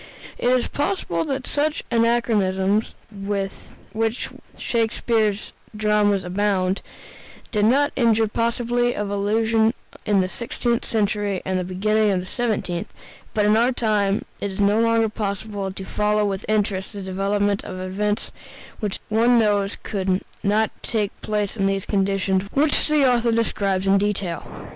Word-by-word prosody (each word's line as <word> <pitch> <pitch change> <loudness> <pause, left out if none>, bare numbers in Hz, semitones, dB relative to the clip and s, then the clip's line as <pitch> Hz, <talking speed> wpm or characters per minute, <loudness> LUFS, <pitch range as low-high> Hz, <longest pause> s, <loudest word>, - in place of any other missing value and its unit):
It - - 0
is 250 -1 +2
possible 285 - -1
that 270 -2 -3
such 300 +1 0
anachronisms 215 -4 +2 0.2
(with 195 -1 -3 0.4
which 225 +2 -1 0.3
Shakespeare's 220 -2 0 0.3
dramas 210 -2 +2
abound) 190 0 0 0.7
did 210 -2 +2
not 280 +6 +3
injure 230 -3 +3
the 220 - 0
possibility 240 +1 0
of 205 -1 -3
illusion 220 +3 +2 0.3
in 205 -2 +4
the 185 - 0
sixteenth 235 +3 -2
century 205 -3 0
and 185 -1 0
the - - -1
beginning 210 +4 +1
of 190 -2 +1
the 180 - -6
seventeenth, 205 -5 -2 0.4
but 210 -1 +3
in 210 +1 +4
our 235 +3 +3
time 210 -4 +1
it 200 - -2
is 190 - -7
no 205 +2 +3
longer 230 0 +3
possible 205 -2 -3
to 190 0 -7
follow 210 +1 +1
with 195 0 -2
interest 205 -2 0
the 200 -1 -6
development 200 +2 0
of 185 - -7
events 205 +3 -2 0.5
which 210 -3 -3
one 235 +3 +4
knows 205 -3 +2
could 190 -2 -1 0.2
not 210 +2 +2
take 210 -4 -1
place 210 -1 -1
in 195 -3 +1
the 195 0 +1
conditions 195 -1 0
which 295 +2 +3
the 300 -3 +4
author 240 -2 +3
describes 200 -4 0
in 195 0 +4
detail. 200 -4 -2
210 Hz, 150 wpm, -23 LUFS, 195-230 Hz, 0.7 s, in